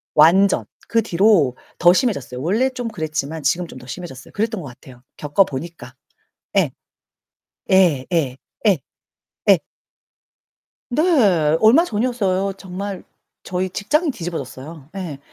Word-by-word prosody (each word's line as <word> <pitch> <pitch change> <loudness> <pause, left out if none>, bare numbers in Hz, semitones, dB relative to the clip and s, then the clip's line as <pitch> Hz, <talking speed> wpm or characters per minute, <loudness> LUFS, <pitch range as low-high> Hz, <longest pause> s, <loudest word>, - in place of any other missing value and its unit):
완전 185 +6 +5 0.2
그 230 - +2
뒤로 185 - +3 0.2
더 175 0 +6
심해졌어요. 140 - -1
원래 215 - +1
좀 250 -2 -5
그랬지만 155 -5 -4
지금은 170 +5 +1
좀 130 - -11
더 125 - -14
심해졌어요. 135 -2 -8
그랬던 220 -1 -1
것 150 - -8
같아요. 125 0 -15 0.2
겪어 150 +6 +3
보니까. 135 -4 -8 0.6
예. - - +3 1.0
예. 170 -9 +4
예. 135 -6 0 0.3
예. 195 -5 +5 0.7
예. - - +7 1.3
네, 300 +6 +2 0.6
얼마 255 +11 +6
전이었어요. 205 - 0
정말 195 +1 -6 0.4
저희 185 +1 -2
직장이 300 - 0
뒤집어졌어요. 160 - -6
예, 170 -8 -5
180 Hz, 260 characters per minute, -20 LUFS, 145-205 Hz, 1.3 s, 예